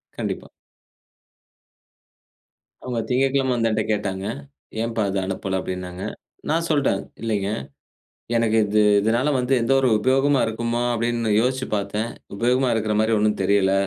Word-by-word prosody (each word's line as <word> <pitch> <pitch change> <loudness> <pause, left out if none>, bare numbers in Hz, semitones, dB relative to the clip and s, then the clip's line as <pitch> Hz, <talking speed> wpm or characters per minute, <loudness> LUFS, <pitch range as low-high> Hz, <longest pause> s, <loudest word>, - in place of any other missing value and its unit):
கண்டிப்பா. - - -4 2.3
அவங்க 125 -2 -2
திங்கட்கிழமை 135 +1 +2
வந்து 115 -1 +1
என்ட்ட 110 0 +1
கேட்டாங்க. 95 -2 -3 0.6
"ஏம்ப்பா, 115 -2 -1
அத 100 - -2
அனுப்பல?" 95 0 -2
அப்படின்னாங்க. 90 0 -5 0.5
நான் 165 +2 +1
சொல்ட்டேன். 140 -10 +2 0.2
இல்லைங்க. 105 -3 -1 0.9
எனக்கு 115 -1 +2
இது 105 +1 +2 0.2
இதனால 115 +7 +1
வந்து 125 +2 -1
எந்த 120 - +1
ஒரு 130 - +3
உபயோகமா 135 +3 +3
இருக்குமா? 115 +2 -2
அப்படின்னு 115 -1 0
யோசிச்சு 130 +2 0
பாத்தேன். 105 +3 -2 0.3
உபயோகமா 125 +4 +2
இருக்கற 110 -1 0
மாரி 110 +1 +2
ஒண்ணும் 105 0 +1
தெரில, 95 0 +3
115 Hz, 125 wpm, -23 LUFS, 100-125 Hz, 2.3 s, ஒரு